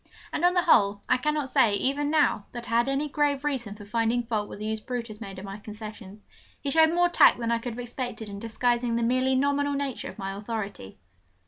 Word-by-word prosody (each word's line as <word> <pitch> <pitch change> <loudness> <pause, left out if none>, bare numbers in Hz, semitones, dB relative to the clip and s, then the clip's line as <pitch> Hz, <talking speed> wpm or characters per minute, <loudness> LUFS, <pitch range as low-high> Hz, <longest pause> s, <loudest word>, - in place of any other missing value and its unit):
And 315 - -2
on 355 +1 +4
the 355 - +3
whole, 200 - +4
I 255 - +3
cannot 300 +1 -1
say, 210 -4 +4
even 280 +6 0
now, 295 -9 +2
that 240 -1 -6
I 230 - +3
had 240 +3 +2
any 275 +2 0
grave 290 -1 0
reason 250 -8 -2
for 210 -1 -11
finding 230 +3 0
fault 220 -3 -2
with - - -8
the 210 - -6
use 220 0 -2
Brutus 230 -2 -6
made 195 -3 -7
of 190 - -7
my 195 +1 -7
concessions; 210 -1 -10 0.4
he 280 - -2
showed 320 +2 +5
more 350 +1 +3
tact 345 - +6
than 235 -1 -2
I 235 - +1
could 235 0 -5
have 235 - -8
expected 245 -2 -5
in 200 -1 -7
disguising 240 +1 0
the 235 - 0
merely 255 +2 +2
nominal 285 +1 +1
nature 280 -3 -3
of - - -11
my 195 -2 -4
authority. 205 - -6
235 Hz, 230 wpm, -27 LUFS, 215-280 Hz, 0.4 s, tact